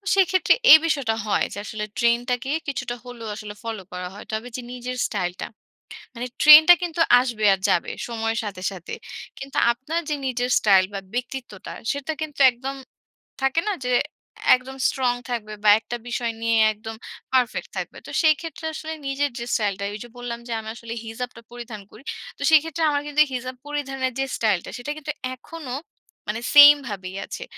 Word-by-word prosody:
সেক্ষেত্রে 375 Hz, -1 st, +4 dB, 0.2 s
এই 315 Hz, -, +13 dB
বিষয়টা 275 Hz, -8 st, 0 dB
হয় -, -, +2 dB
যে, -, -, -8 dB
আসলে 210 Hz, -2 st, -4 dB
ট্রেন্ডটাকে 245 Hz, +2 st, +1 dB, 0.2 s
কিছুটা 245 Hz, -3 st, -3 dB
হলেও 235 Hz, -2 st, -8 dB
আসলে 210 Hz, -1 st, -8 dB
ফলো 225 Hz, -3 st, -4 dB
করা 180 Hz, 0 st, -5 dB
হয়। 205 Hz, -, -10 dB
তবে 220 Hz, +3 st, -3 dB
যে 250 Hz, -, -5 dB
নিজের 250 Hz, 0 st, -5 dB
স্টাইলটা, 180 Hz, -3 st, -3 dB, 0.7 s
মানে 245 Hz, +2 st, -4 dB
ট্রেন্ডটা 310 Hz, +3 st, +10 dB
কিন্তু 335 Hz, -1 st, -2 dB, 0.2 s
আসবে 235 Hz, -4 st, -2 dB
আর 190 Hz, -, -2 dB
যাবে 170 Hz, -, +1 dB, 0.2 s
সময়ের 225 Hz, -1 st, -2 dB
সাথে, 190 Hz, -3 st, -6 dB
সাথে। 180 Hz, -3 st, -8 dB, 0.5 s
কিন্তু 270 Hz, 0 st, -7 dB
আপনার 290 Hz, +8 st, -3 dB
যে 300 Hz, -, 0 dB
নিজের 245 Hz, 0 st, -1 dB
স্টাইল 195 Hz, -3 st, +5 dB
বা 195 Hz, -, -3 dB, 0.2 s
ব্যক্তিত্বটা, 245 Hz, -5 st, -5 dB, 0.2 s
সেটা 285 Hz, +2 st, -3 dB
কিন্তু 300 Hz, -2 st, -5 dB
একদম 265 Hz, +3 st, -6 dB, 0.7 s
থাকে 270 Hz, +5 st, +2 dB
না, 415 Hz, -, +1 dB
যে 250 Hz, -, 0 dB, 0.6 s
একদম 265 Hz, +1 st, -9 dB
স্ট্রং 255 Hz, -3 st, +1 dB, 0.2 s
থাকবে, 220 Hz, -3 st, -4 dB
বা 210 Hz, -, +6 dB
একটা 240 Hz, +2 st, -6 dB
বিষয় 235 Hz, -1 st, -2 dB
নিয়ে 230 Hz, 0 st, +2 dB, 0.2 s
একদম 220 Hz, +1 st, -8 dB, 0.4 s
পারফেক্ট 250 Hz, -2 st, +1 dB
থাকবে। -, -, -5 dB
তো -, -, -8 dB
সেই 315 Hz, -2 st, +6 dB
ক্ষেত্রে 325 Hz, -1 st, -7 dB
আসলে 315 Hz, 0 st, -5 dB
নিজের 275 Hz, 0 st, 0 dB
যে 235 Hz, -, -4 dB
স্টাইলটা, 200 Hz, -3 st, 0 dB
ওই 210 Hz, -, -6 dB
যে 240 Hz, -, -12 dB
বললাম, 240 Hz, -1 st, -5 dB
যে -, -, -7 dB
আমি 220 Hz, -, -7 dB
আসলে 230 Hz, -1 st, -7 dB
হিজাবটা 230 Hz, +1 st, -6 dB
পরিধান 235 Hz, -3 st, -8 dB
করি। -, -, -15 dB, 0.3 s
তো -, -, -14 dB
সেই 315 Hz, -, +9 dB
ক্ষেত্রে 325 Hz, 0 st, -3 dB
আমার 285 Hz, -, 0 dB
কিন্তু 295 Hz, +1 st, +2 dB
হিজাব 255 Hz, 0 st, -4 dB
পরিধানের 270 Hz, -3 st, -3 dB
যে 270 Hz, -, +1 dB
স্টাইলটা, 210 Hz, -6 st, 0 dB
সেটা 245 Hz, +5 st, -5 dB
কিন্তু 300 Hz, 0 st, -4 dB, 0.2 s
এখনো 270 Hz, 0 st, -9 dB, 0.6 s
মানে 225 Hz, +3 st, -2 dB
সেমভাবেই 260 Hz, -11 st, +7 dB
আছে। -, -, -7 dB
245 Hz, 175 wpm, -23 LUFS, 225-280 Hz, 0.7 s, এই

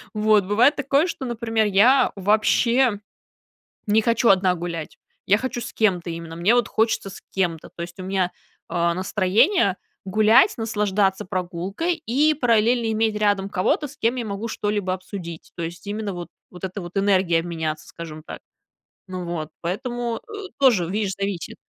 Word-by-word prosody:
Вот 210 Hz, -2 st, +3 dB
бывает 225 Hz, +9 st, +4 dB
такое, 280 Hz, +3 st, +2 dB
что, 330 Hz, -6 st, -5 dB
например, 225 Hz, -2 st, 0 dB
я 225 Hz, +8 st, +5 dB
вообще 215 Hz, +3 st, +2 dB, 0.9 s
не 210 Hz, +1 st, +4 dB
хочу 230 Hz, +1 st, +2 dB
одна 185 Hz, -1 st, +4 dB
гулять, 170 Hz, -2 st, -5 dB, 0.3 s
я 205 Hz, -, +5 dB
хочу 250 Hz, 0 st, -3 dB
с -, -, -6 dB
кем-то 185 Hz, -6 st, +1 dB
именно, 165 Hz, -1 st, -6 dB
мне 195 Hz, +8 st, +3 dB
вот 240 Hz, -2 st, +2 dB
хочется 220 Hz, -3 st, 0 dB
с -, -, -10 dB
кем-то. 170 Hz, -4 st, -1 dB
То 170 Hz, -, -6 dB
есть 175 Hz, +2 st, -8 dB
у -, -, -5 dB
меня, 185 Hz, -1 st, 0 dB, 0.4 s
э, 170 Hz, 0 st, +1 dB
настроение 195 Hz, -, +2 dB, 0.3 s
гулять, 215 Hz, -, +5 dB
наслаждаться 210 Hz, -3 st, 0 dB
прогулкой 185 Hz, -, -2 dB
и 305 Hz, 0 st, +1 dB
параллельно 235 Hz, -3 st, +2 dB
иметь 220 Hz, 0 st, +1 dB
рядом 205 Hz, -2 st, +1 dB
кого-то, 205 Hz, +9 st, 0 dB
с 285 Hz, -, -14 dB
кем 235 Hz, +3 st, 0 dB
я 240 Hz, -, -3 dB
могу 205 Hz, +3 st, -4 dB
что-либо 205 Hz, -3 st, -2 dB
обсудить. 185 Hz, -3 st, -7 dB
То 170 Hz, -, -4 dB
есть 170 Hz, +4 st, -7 dB
именно 205 Hz, -1 st, -3 dB
вот 175 Hz, -1 st, -7 dB, 0.2 s
вот 180 Hz, 0 st, -13 dB
эта 190 Hz, +2 st, -4 dB
вот 175 Hz, +2 st, -10 dB
энергиями 190 Hz, -4 st, +3 dB
обменяться, 160 Hz, -2 st, -4 dB
скажем 155 Hz, -2 st, -9 dB
так. -, -, -9 dB, 0.7 s
Ну 185 Hz, -1 st, -5 dB
вот 165 Hz, -3 st, -4 dB
поэтому, 235 Hz, +5 st, -3 dB
э, 410 Hz, -3 st, -7 dB
тоже, 230 Hz, -11 st, +4 dB
видишь, 200 Hz, 0 st, -1 dB
зависит. 195 Hz, -3 st, -3 dB
205 Hz, 165 wpm, -23 LUFS, 180-230 Hz, 0.9 s, я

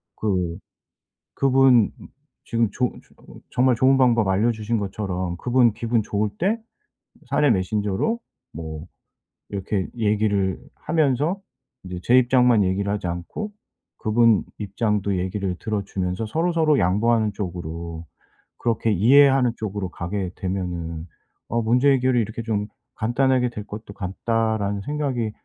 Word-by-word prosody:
그 90 Hz, -5 st, -1 dB, 0.8 s
그분 130 Hz, -4 st, +5 dB, 0.6 s
지금 115 Hz, -2 st, +1 dB
좋 125 Hz, -1 st, 0 dB
좋 -, -, -17 dB
정말 125 Hz, 0 st, +3 dB
좋은 130 Hz, +3 st, +4 dB
방법 120 Hz, -5 st, +3 dB
알려주신 110 Hz, +3 st, +1 dB
것처럼 95 Hz, -3 st, -3 dB
그분 120 Hz, -1 st, +3 dB
기분 115 Hz, 0 st, 0 dB
좋을 105 Hz, +1 st, -1 dB
때 200 Hz, +6 st, +1 dB, 0.7 s
사내 145 Hz, -, +3 dB
메신저로 105 Hz, -, 0 dB, 0.3 s
뭐 80 Hz, 0 st, -7 dB, 0.6 s
이렇게 100 Hz, -1 st, -2 dB
얘기를 105 Hz, -3 st, +1 dB, 0.2 s
하면서 155 Hz, +4 st, 0 dB, 0.4 s
이제 90 Hz, -1 st, -6 dB
'제 125 Hz, -, +5 dB
입장만 125 Hz, -3 st, +4 dB
얘기를 95 Hz, +2 st, 0 dB
하지 100 Hz, -3 st, -2 dB
않고 90 Hz, -, -5 dB, 0.5 s
그분 115 Hz, 0 st, +3 dB, 0.2 s
입장도 105 Hz, -1 st, -1 dB
얘기를 95 Hz, 0 st, -2 dB
들어주면서 100 Hz, -2 st, -2 dB
서로 165 Hz, +9 st, 0 dB
서로 155 Hz, -3 st, +3 dB
양보하는 105 Hz, +3 st, +2 dB
쪽으로 85 Hz, -3 st, -6 dB, 0.5 s
그렇게 115 Hz, -1 st, 0 dB
이해하는 130 Hz, +5 st, +5 dB
쪽으로 100 Hz, -3 st, -4 dB
가게 90 Hz, +2 st, -4 dB
되면은 85 Hz, -3 st, -4 dB, 0.4 s
어 115 Hz, +1 st, 0 dB
문제 125 Hz, +5 st, +3 dB
해결이 130 Hz, -2 st, +2 dB
이렇게 110 Hz, +2 st, -4 dB
좀 105 Hz, -2 st, -1 dB, 0.3 s
간단하게 125 Hz, +2 st, +1 dB
될 105 Hz, -3 st, -7 dB
것도 105 Hz, -1 st, -8 dB
같다.'라는 105 Hz, +1 st, -1 dB
생각이 135 Hz, -4 st, -2 dB
110 Hz, 280 characters per minute, -23 LUFS, 95-125 Hz, 0.8 s, 그분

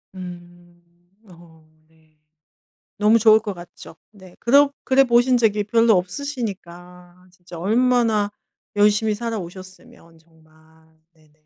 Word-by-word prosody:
음. 175 Hz, -1 st, -12 dB, 0.5 s
어 165 Hz, -2 st, -19 dB, 0.2 s
네. 160 Hz, -1 st, -32 dB, 0.8 s
너무 215 Hz, +2 st, +4 dB
좋을 220 Hz, 0 st, +5 dB
것 205 Hz, -3 st, -6 dB
같죠. 175 Hz, -1 st, -14 dB, 0.2 s
네 185 Hz, -3 st, -17 dB
그러 280 Hz, +4 st, +3 dB
그래 270 Hz, +1 st, +3 dB
보신 245 Hz, +1 st, +3 dB
적이 210 Hz, -3 st, +1 dB
별로 230 Hz, +1 st, +3 dB
없으시니까 180 Hz, -5 st, -7 dB
진짜 175 Hz, -1 st, -13 dB
얼마나 225 Hz, 0 st, +1 dB, 0.5 s
열심히 210 Hz, +1 st, +2 dB
살아오셨으면 185 Hz, -6 st, -9 dB
정말. 160 Hz, -1 st, -27 dB, 0.6 s
네. 155 Hz, -2 st, -28 dB
185 Hz, 225 characters per minute, -21 LUFS, 175-225 Hz, 0.8 s, 좋을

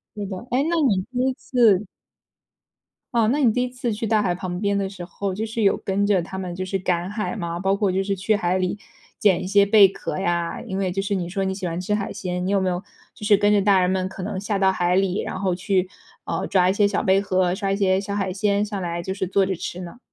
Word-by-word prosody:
对 205 Hz, -1 st, -4 dB
的， 190 Hz, -1 st, -5 dB
哎， 255 Hz, +3 st, +2 dB
那 340 Hz, -, +1 dB
你 190 Hz, -3 st, +1 dB
第 250 Hz, -, -3 dB
一 -, -, -1 dB
次 225 Hz, -6 st, +2 dB, 1.3 s
哦， 230 Hz, -2 st, +3 dB
那 280 Hz, -, +1 dB
你 235 Hz, -, +5 dB
第 250 Hz, +3 st, 0 dB
一 250 Hz, -, -2 dB
次 250 Hz, -2 st, -3 dB
去 225 Hz, +2 st, -3 dB
大 215 Hz, 0 st, +3 dB
海 180 Hz, -3 st, 0 dB
旁 180 Hz, -1 st, -4 dB
边 200 Hz, 0 st, 0 dB
的 195 Hz, -1 st, -1 dB
时 180 Hz, -3 st, -8 dB
候， 195 Hz, +2 st, -4 dB
就 215 Hz, +4 st, -3 dB
是 225 Hz, +1 st, -3 dB
有 195 Hz, -, +4 dB
跟 200 Hz, +1 st, -1 dB
着 200 Hz, -3 st, +3 dB
他 190 Hz, +2 st, -7 dB
们 185 Hz, -2 st, -4 dB
就 185 Hz, +1 st, -4 dB
是 195 Hz, +1 st, -1 dB
赶 180 Hz, -1 st, -1 dB
海 210 Hz, +3 st, -3 dB
吗？ 170 Hz, -3 st, -4 dB
包 195 Hz, +1 st, +1 dB
括 200 Hz, -2 st, +1 dB
就 190 Hz, +1 st, 0 dB
是 200 Hz, 0 st, -1 dB
去 195 Hz, +3 st, +1 dB
海 180 Hz, -2 st, 0 dB
里， 185 Hz, +1 st, -1 dB, 0.4 s
捡 195 Hz, -4 st, +3 dB
一 -, -, -4 dB
些 200 Hz, +1 st, +5 dB
贝 200 Hz, -1 st, +7 dB
壳 190 Hz, -, -5 dB
呀？ 175 Hz, -2 st, -1 dB
因 190 Hz, -, -5 dB
为 190 Hz, -2 st, 0 dB
就 195 Hz, -, -1 dB
是 200 Hz, +1 st, -1 dB
你 175 Hz, -2 st, -3 dB
说 195 Hz, +1 st, -2 dB
你 190 Hz, -, -1 dB
喜 190 Hz, -, -5 dB
欢 170 Hz, 0 st, -3 dB
吃 210 Hz, +3 st, -1 dB
海 200 Hz, -1 st, -3 dB
鲜， 180 Hz, -3 st, -3 dB
你 190 Hz, -, -1 dB
有 200 Hz, -, +3 dB
没 190 Hz, -1 st, 0 dB
有， 180 Hz, +1 st, -3 dB, 0.3 s
就 210 Hz, -, -9 dB
是 205 Hz, -1 st, +5 dB
跟 205 Hz, 0 st, +3 dB
着 205 Hz, -, +4 dB
大 195 Hz, -1 st, +4 dB
人 180 Hz, -, +2 dB
们 185 Hz, 0 st, -1 dB
可 190 Hz, -, -8 dB
能 195 Hz, -1 st, -4 dB
下 205 Hz, +1 st, -2 dB
到 190 Hz, -1 st, +4 dB
海 180 Hz, -1 st, +1 dB
里， 195 Hz, 0 st, +1 dB
然 185 Hz, -, -5 dB
后 185 Hz, -2 st, 0 dB
去， 185 Hz, 0 st, 0 dB, 0.4 s
呃， -, -, -2 dB
抓 185 Hz, -2 st, +3 dB
一 190 Hz, -, +2 dB
些 205 Hz, 0 st, +3 dB
小 200 Hz, -, 0 dB
贝 190 Hz, +1 st, +3 dB
壳， 185 Hz, -2 st, +1 dB
抓 195 Hz, -1 st, -2 dB
一 195 Hz, -, 0 dB
些 190 Hz, -1 st, +2 dB
小 200 Hz, 0 st, -4 dB
海 195 Hz, -2 st, -1 dB
鲜 200 Hz, +1 st, +1 dB
上 205 Hz, -2 st, -5 dB
来， 170 Hz, -1 st, -3 dB
就 190 Hz, +2 st, -4 dB
是 190 Hz, -1 st, -2 dB
坐 195 Hz, +1 st, +2 dB
着 190 Hz, -1 st, -2 dB
吃 175 Hz, +2 st, -6 dB
呢？ 180 Hz, +7 st, -9 dB
195 Hz, 300 characters per minute, -23 LUFS, 185-205 Hz, 1.3 s, 贝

